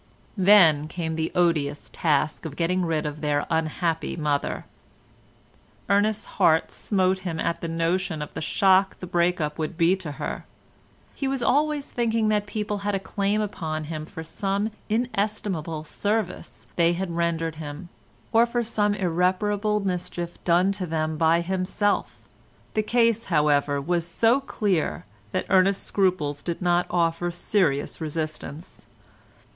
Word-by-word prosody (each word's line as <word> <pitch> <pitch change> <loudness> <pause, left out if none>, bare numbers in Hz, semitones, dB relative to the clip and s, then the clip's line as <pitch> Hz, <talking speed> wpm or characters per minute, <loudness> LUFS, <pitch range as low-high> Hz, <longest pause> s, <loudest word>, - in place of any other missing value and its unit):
Then 175 -7 +6
came 160 0 -3
the 160 0 -2
odious 165 -5 +1
task 155 -2 +1
of 150 -3 -5
getting 180 +3 +1
rid 160 -3 -1
of 150 0 -5
their 145 -1 0
unhappy 160 +1 -1
mother. 150 -3 -1 1.2
Ernest's 205 +1 +2
heart 160 0 +2
smote 190 -2 +1
him 175 -4 -4
at 170 +1 -1
the 170 - -3
notion 165 0 -1
of 150 - -10
the 160 - -5
shock 190 +4 +3
the - - -6
break 175 0 +1
up 150 0 -3
would 160 +2 -3
be 170 +2 +4
to 165 -6 -6
her. - - -5 0.7
He 275 - -3
was 265 -2 -1
always 295 +2 +1
thinking 230 -2 +1
that 210 -1 +1
people 210 -1 -3
had 200 0 -1
a - - 0
claim 200 +2 -1
upon 160 -6 -3
him 155 0 -6
for 165 -4 -8
some 200 +6 -2 0.2
inestimable 205 -8 -1
service 205 +3 -3
they 170 0 +4
had 175 -1 -3
rendered 165 -1 -1
him, 155 +3 -7 0.4
or 230 +1 +5
for 240 0 -1
some 210 -2 +1
irreparable 195 +3 +1
mischief 175 -2 -4
done 180 +3 +3
to 195 -2 -3
them 155 -1 -1
by 165 +2 +3
himself; 190 +3 -1 0.5
the 215 - +2
case 230 0 +2
however 150 -3 +2
was 170 +3 -1
so 230 +9 +3
clear, 200 - -1 0.3
that - - -1
Ernest's 190 0 +3
scruples 175 -7 0
did 170 -1 -3
not 175 -1 +2
offer 170 0 +1
serious 175 -5 0
resistance. 155 0 -5
175 Hz, 145 wpm, -25 LUFS, 160-205 Hz, 1.2 s, Then